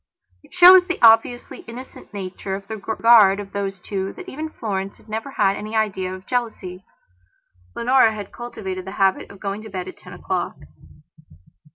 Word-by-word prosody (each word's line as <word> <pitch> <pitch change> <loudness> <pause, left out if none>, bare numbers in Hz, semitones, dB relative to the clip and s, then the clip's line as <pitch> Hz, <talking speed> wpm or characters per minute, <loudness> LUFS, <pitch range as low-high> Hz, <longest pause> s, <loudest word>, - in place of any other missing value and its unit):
It - - -22
shows 365 0 +8
the 360 - -2
obviously 225 +2 +4
innocent 250 +3 -11
nature 195 -1 -5
of 195 0 -9
the 220 - -5
regard 220 -2 +4
of 200 -1 -8
those 195 -1 -3
two 195 +1 -4
that 370 - -11
even 315 +1 -6
Florence 195 -8 -4
had - - -23
never 220 +5 -5
had 200 -7 +1
any 215 +1 -6
idea 190 -4 -1
of 185 0 -9
jealousy. 215 -7 -4 0.9
Leonora 235 0 +4
had 205 -2 -7
cultivated 190 -6 -6
the 190 - -7
habit 195 -1 +1
of 200 - -13
going 200 +1 -4
to 220 - -10
bed 185 -2 -5
at - - -9
ten - - -12
o'clock. - - -3
210 Hz, 175 wpm, -21 LUFS, 195-235 Hz, 0.9 s, shows